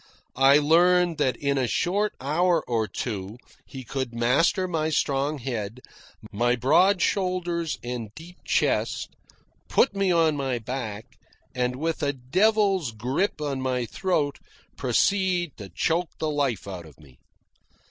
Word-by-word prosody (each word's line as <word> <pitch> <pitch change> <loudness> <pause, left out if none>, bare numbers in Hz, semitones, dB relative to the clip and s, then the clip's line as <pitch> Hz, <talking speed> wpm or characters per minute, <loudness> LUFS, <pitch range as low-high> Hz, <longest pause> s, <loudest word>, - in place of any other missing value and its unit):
I 135 +1 +7
learned 170 +2 +3
that 130 -5 +1
in 140 -1 0
a 130 - +1
short 200 - 0
hour 165 +4 +1
or 115 -3 0
two 100 0 -5 0.3
he 130 -1 -8
could 130 -2 -4
master 140 +10 +2
my 160 -3 -1
strong 145 0 0
head, 120 -3 -4 0.5
my 120 +4 +1
broad 175 - +3
shoulders 175 -4 -1
and 120 -3 -5
deep 175 +3 -12
chest, - - 0 0.5
put 230 - +3
me 195 -2 +1
on 165 -3 +3
my 135 -3 -1
back, 115 -2 -5 0.5
and 125 -1 -1
with 160 +4 -2
a 145 -1 0
devil's 190 - +1
grip 130 - -1
on 140 -3 -2
my 130 -2 -1
throat 150 - -1 0.4
proceed 175 - +1
to 100 -3 -9
choke 165 - 0
the 155 -1 -1
life 140 -8 -1
out 90 -4 -7
of 75 - -18
me. 70 -5 -19
140 Hz, 140 wpm, -25 LUFS, 120-175 Hz, 0.5 s, I